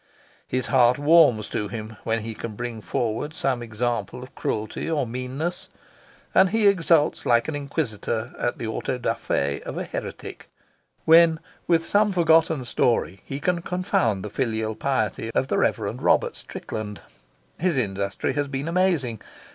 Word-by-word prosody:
His 130 -2 -1
heart 120 +1 +4
warms 145 -8 +5
to 105 - -2
him 110 +1 -7
when 115 0 0
he 115 +1 -5
can 110 0 -6
bring 120 -1 -5
forward 120 - -2
some 130 -3 0
example 120 +2 -3
of 130 - -12
cruelty 110 +8 -3
or 155 -5 +1
meanness, 130 +8 -4 0.6
and 190 - +6
he 220 +1 +3
exults 165 -5 +3
like 120 -1 +3
an 155 - -3
inquisitor 125 -5 -3
at 120 - -1
the 115 - -5
of 110 - -2
an - - -3
heretic - - -7 0.6
when 165 0 +6 0.3
with 165 -1 +3
some 210 0 +3
forgotten 165 -5 +3
story 115 -6 0
he 135 - -5
can 175 +3 0
confound 120 - 0
the 105 - -6
filial 110 -3 -1
piety 110 -2 -1
of 135 - +1
the - - +1
Rev. - - +2
Robert - - +1
Strickland. 105 -2 -7 0.6
His 175 -3 +1
industry 100 +1 -1
has 145 +1 -1
been 135 +2 -4
amazing. 165 - +1
125 Hz, 145 wpm, -24 LUFS, 110-160 Hz, 0.6 s, and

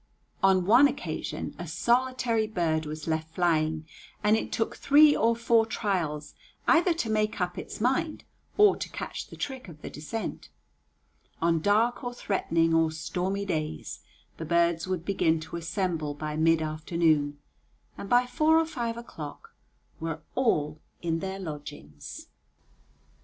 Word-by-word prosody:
On 190 -2 +4
one 245 +8 +7
occasion - - -4
a - - -5
solitary 240 -2 +1
bird 160 -6 0
was 155 0 -6
left 160 0 -2
flying, 160 -3 +1 0.4
and 210 +1 +5
it 220 - -2
took 225 - -1
three 295 +1 +6
or 230 +1 +3
four 230 0 +3
trials 175 -9 -2 0.3
either 350 +2 +5
to 240 -9 -2
make 215 0 0
up 180 -1 -1
its - - -7
mind 305 +8 0 0.3
or 415 -1 +6
to - - -5
catch - - -6
the - - -11
trick 265 -4 -5
of 155 -4 -13
the - - -6
descent. 185 +10 -5 0.9
On 165 0 +2
dark 225 - +2
or 245 0 -4
threatening 165 -6 +1
or 165 0 +4
stormy 180 +5 -2
days 155 - -3 0.4
the - - -5
birds 170 +1 +2
would 185 -3 -2
begin 165 -5 +2
to 160 +2 -8
assemble 165 -3 -2
by 150 0 -4
mid 160 +1 +3
afternoon, 155 -2 +1 0.6
and 200 - -8
by 245 +1 +5
four 310 +5 +3
or 325 - +3
five 235 -7 -3
o'clock 165 -11 -9 0.5
were 160 -1 -4
all 155 - +1 0.2
in 165 -1 0
their 190 +2 -4
lodgings. 145 - -8
180 Hz, 145 wpm, -28 LUFS, 160-230 Hz, 0.9 s, one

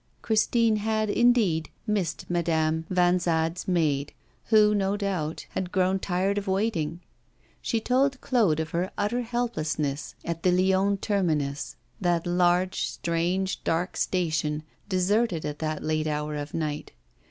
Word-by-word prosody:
Christine 225 0 +2
had, 215 0 0
indeed, 220 -10 +3 0.2
missed 200 -7 -1
Madame 160 -2 0
Vanzade's 175 -2 +1
maid, 150 -6 +1 0.3
who, 210 -1 +5
no 200 0 +1
doubt, 185 -6 -2
had 185 -1 -3
grown 185 +1 +2
tired 190 +2 0
of 200 - -9
waiting. 190 -5 -1 0.6
She 230 - 0
told 265 +4 +1
Claude 215 - +2
of 160 0 -3
her 175 +2 -1
utter 210 +4 0
helplessness 155 - -2
at 165 -1 -3
the 180 - +3
Lyons 190 +2 +3
terminus 150 - -1 0.2
that 175 -2 +1
large, 180 +1 +2
strange, 175 +3 -1
dark 170 +3 -1
station, 155 -4 0 0.3
deserted 190 -1 +1
at 150 0 -4
that 155 -1 -3
late 155 0 0
hour 150 0 -2
of 145 0 -5
night. 150 -2 -3
180 Hz, 130 wpm, -26 LUFS, 160-205 Hz, 0.6 s, who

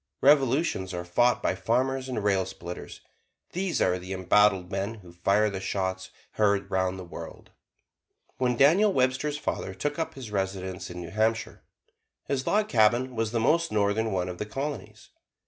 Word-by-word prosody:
Revolutions 135 - +3
are 85 0 -4
fought 120 +8 +2
by - - +2
farmers 130 +3 0
and 115 -5 -3
rail 100 -2 +2
splitters; 90 0 -8 0.5
these 185 0 -1
are 90 0 +1
the 90 +2 -6
embattled 95 0 +3
men 100 +3 -2
who 90 -5 -14
fire 100 +5 +2
the 100 -2 -3
shots 95 -1 -3 0.2
heard 100 -2 +1
'round 95 0 0
the 95 - -7
world. 85 - -10 0.9
When 125 -2 +1
Daniel 180 - +5
Webster's 130 0 +1
father 95 -9 -3
took 145 - -3
up 160 - -3
his 125 -6 -8
residence 95 -2 -3
in 90 0 -7
New 85 -1 -8
Hampshire, 110 +2 0 0.6
his 135 -1 -2
log 210 +1 +2
cabin 120 - +3
was 115 -1 -1
the 115 - 0
most 165 +8 +2
northern 105 +1 +1
one 90 -2 -1
of 90 -1 -6
the 105 - -2
Colonies. 140 +5 -6
105 Hz, 165 wpm, -27 LUFS, 95-130 Hz, 0.9 s, Daniel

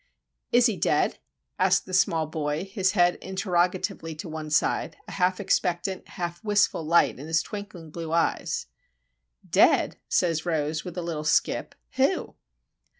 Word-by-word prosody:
"Is 245 0 +5
he 220 -6 +2
dead?" - - +1 0.4
asked - - +3
the 185 - -9
small 165 -3 +3
boy, 155 +2 -3
his 195 -1 0
head 175 -3 +3
interrogatively 180 -3 -1
to 155 - -7
one 155 -1 -6
side, 150 - +1
a - - -8
half 185 -1 +1
expectant, 185 -1 -1
half 175 +1 -5
wistful 205 -5 +2
light 165 -4 +3
in 145 - -8
his 160 0 +2
twinkling 195 -6 -8
blue 165 0 -6
eyes. 170 0 0 0.8
"Dead?" - - +4
says 165 -3 +1
Rose, 155 -2 -1
with 180 -1 -8
a 175 - -2
little 160 -3 -3
skip. 155 - +1 0.2
"Who?" - - +1
175 Hz, 150 wpm, -26 LUFS, 160-185 Hz, 0.8 s, Is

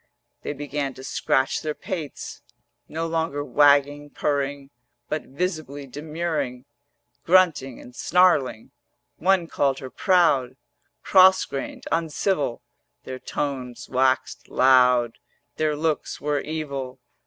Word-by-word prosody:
They - - -4
began 145 -1 -4
to 130 - -11
scratch 135 0 0
their 155 -1 -3
pates, 175 -7 -6 0.5
390 - - -17
No 165 +1 -1
longer 160 -3 -2
wagging, 145 +2 +3
purring, 140 -1 -2 0.4
But 155 - -3
visibly 150 -2 -4
demurring, 145 -2 -4 0.6
Grunting 165 -8 +3
and 125 - -13
snarling. 155 -11 +2 0.5
One 185 0 +2
called 140 -4 0
her 130 -1 -8
proud, 145 -9 +2 0.5
Cross 190 0 +6
grained, 135 - -6
uncivil; 165 -4 -1 0.4
Their 130 0 -7
tones 130 -5 -4
waxed 130 0 0
loud, 125 -2 +4 0.4
Their 155 -1 +1
looks 155 0 -2
were 145 0 0
evil. 140 -4 -5
145 Hz, 110 wpm, -24 LUFS, 130-160 Hz, 0.6 s, Cross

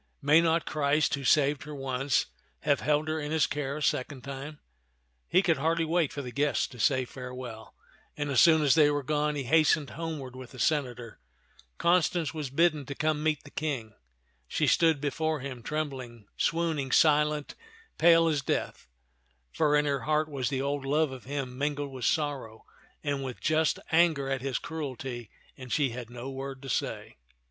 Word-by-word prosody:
May 150 +3 +5
not 165 0 +2
Christ, 150 0 +1
who 140 - -2
saved 140 +1 +3
her 150 +1 -8
once, 135 0 0 0.4
have 145 -2 +2
held 150 +1 +1
her 155 0 -1
in 150 -1 -4
his 155 -1 +3
care 140 -1 -3
a 150 - -4
second 130 -1 -1
time? 140 +2 -7 0.4
" - - -45
He 185 +3 +3
could 170 -3 +2
hardly 165 +3 +1
wait 165 -2 +1
for 145 -4 -5
the 125 - -6
guests 145 +2 +1
to 125 - -13
say 130 +2 +2
farewell; 125 -3 -8 0.4
and 145 -1 -2
as 130 - +5
soon 160 -2 +6
as 140 - +5
they 150 -2 +5
were 145 -1 -1
gone, 150 +1 0
he 140 - -2
hastened 155 +1 +3
homeward 150 -5 -5
with 130 0 -10
the 130 - -11
senator. 125 -7 -1 0.6
Con 175 +1 +4
stance 165 -1 -1
was 150 -4 -4
bidden 155 +1 +2
to 140 - -5
come 155 +1 0
to - - -5
meet 155 -2 0
the 145 - -14
King. 135 -8 -3 0.5
She - - 0
stood 160 -4 +3
before 155 +1 -1
him, 130 -3 -6
trembling, 130 -6 -5
swooning, 160 -5 0
silent, 150 -1 +3 0.5
pale 165 0 +6
as 150 -3 +1
death; 130 - -3 0.7
for 150 -2 +2
in 150 0 +3
her 140 -1 0
heart 155 +2 +1
was 135 -4 -2
the 135 -1 -1
old 140 0 -2
love 150 +2 +1
of 130 -2 -9
him 135 -2 -4
min 145 +1 0
gled 145 -1 -4
with 130 -2 -5
sorrow 140 -8 -1 0.4
and 140 -1 -1
with 130 -2 -6
just 155 +1 +2
anger 160 -4 +3
at 135 -1 -1
his 135 -1 -1
cruelty, 130 -7 -6 0.3
and 130 -2 -10
she 145 -4 +2
had 120 -1 -7
no 120 +2 -7
word 135 0 -6
to 135 - -7
say. - - -3
145 Hz, 190 wpm, -29 LUFS, 130-155 Hz, 0.7 s, soon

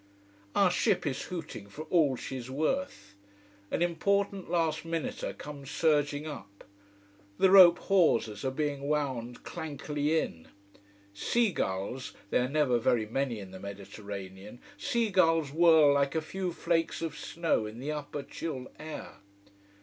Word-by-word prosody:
Our 195 -3 +5
ship 200 0 +1
is 135 -3 -2
hooting 150 - -7
for 150 +9 -7
all 150 -7 +4
she's 130 0 -6
worth. 145 - -2 0.6
An 170 - 0
important 200 +3 0
last 165 -2 0
minuter 165 -1 -3
comes 140 -2 -9
surging 145 -1 +1
up. 100 -10 -9 0.7
The 190 - +4
rope 180 -3 +9
hawsers 115 - +2
are 135 - +1
being 140 0 -2
wound 130 -5 -2
clankily 150 -1 -1
in. 80 - -5 0.7
Seagulls 125 - -1 0.2
they - - +3
are 125 +1 0
never 140 -5 +2
very 115 -1 +2
many 120 +1 -1
in 95 -2 -9
the 95 - -9
Mediterranean 100 +1 -8 0.2
seagulls 180 - +2
whirl 160 -2 +6
like 140 +1 +1
a 160 - +1
few 185 +2 -3
flakes 165 0 -1
of 160 -2 -3
snow 160 -7 -1
in 110 +1 -9
the 140 +5 -4
upper 145 -1 -5
chill 135 -3 -6
air. 155 0 -8
150 Hz, 135 wpm, -30 LUFS, 125-165 Hz, 0.7 s, rope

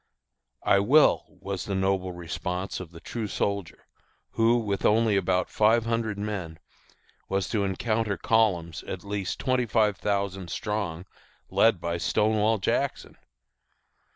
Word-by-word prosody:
"I 100 - +4
will," 140 +10 +4
was 95 -1 -6
the 100 - -2
noble 95 -1 0
response 90 +2 -4
of 90 -3 -8
the 85 0 -12
true 110 +4 -4
soldier, 100 -3 -3 0.5
who, 115 +1 +3
with 100 -4 -2
only 110 0 +3
about 90 -1 +1
five 110 +2 +3
hundred 115 -2 -1
men, 100 -6 -4 0.7
was 95 -1 0
to 105 -3 0
encounter 110 +2 -1
columns 90 -7 +1
at 90 - -6
least 100 -2 -3
twenty 130 -2 0
five 105 -3 +2
thousand 100 -3 -2
strong, 100 -5 -3 0.5
led 115 -5 +4
by 85 0 -2
Stonewall 110 +5 +2
Jackson! 95 - -1
100 Hz, 130 wpm, -27 LUFS, 90-110 Hz, 0.7 s, I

